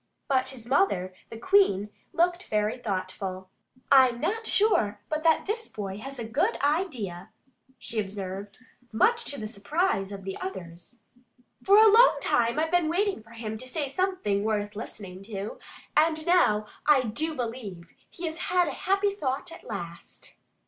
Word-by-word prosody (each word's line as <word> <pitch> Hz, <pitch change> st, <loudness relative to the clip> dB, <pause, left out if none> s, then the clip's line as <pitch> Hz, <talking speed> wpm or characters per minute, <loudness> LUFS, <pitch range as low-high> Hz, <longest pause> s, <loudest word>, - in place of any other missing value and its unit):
But 260 Hz, -2 st, +2 dB
his 250 Hz, -4 st, -7 dB
mother, 220 Hz, -, +2 dB, 0.2 s
the 225 Hz, -, -8 dB
Queen, 225 Hz, -, +3 dB, 0.2 s
looked 350 Hz, +2 st, +1 dB
very 210 Hz, 0 st, 0 dB
thoughtful. 185 Hz, -2 st, -4 dB, 0.4 s
"I'm 260 Hz, -3 st, +6 dB
not 445 Hz, -, -2 dB
sure 400 Hz, -, +2 dB
but 310 Hz, 0 st, -1 dB
that 320 Hz, 0 st, +3 dB
this 450 Hz, +3 st, -3 dB
boy 195 Hz, -1 st, -6 dB
has 270 Hz, +4 st, -7 dB
a 235 Hz, -, -4 dB
good 310 Hz, -, +1 dB
idea," 265 Hz, -, -1 dB, 0.5 s
she 225 Hz, -, -4 dB
observed, 195 Hz, 0 st, -5 dB, 0.3 s
much 465 Hz, -, +2 dB
to 285 Hz, -, -4 dB
the 215 Hz, -, -4 dB
surprise 210 Hz, -, -1 dB
of 195 Hz, -1 st, -7 dB
the 195 Hz, 0 st, -4 dB
others. 185 Hz, -, -8 dB, 0.6 s
"For 400 Hz, +1 st, +6 dB
a 440 Hz, +1 st, +9 dB
long 460 Hz, +4 st, +7 dB
time 235 Hz, +3 st, +1 dB
I've 320 Hz, +1 st, 0 dB
been 350 Hz, -3 st, +3 dB
waiting 390 Hz, -, 0 dB
for 225 Hz, -, -21 dB
him 220 Hz, -1 st, -5 dB
to 255 Hz, -, -8 dB
say 285 Hz, +2 st, -2 dB
something 275 Hz, -, 0 dB
worth 210 Hz, -1 st, -1 dB
listening 195 Hz, -3 st, -8 dB
to. 205 Hz, -1 st, -6 dB, 0.4 s
And 315 Hz, 0 st, +3 dB
now 280 Hz, -13 st, +4 dB, 0.2 s
I 290 Hz, -4 st, +6 dB
do 300 Hz, +8 st, -2 dB
believe 225 Hz, -9 st, -5 dB, 0.2 s
he 345 Hz, -, -7 dB
has 320 Hz, 0 st, -4 dB
had 360 Hz, -1 st, +3 dB
a 275 Hz, -, -8 dB
happy 395 Hz, +1 st, +2 dB
thought 285 Hz, -2 st, -3 dB
at 335 Hz, -, -11 dB
last." 170 Hz, 0 st, -8 dB
250 Hz, 165 wpm, -27 LUFS, -, 0.6 s, a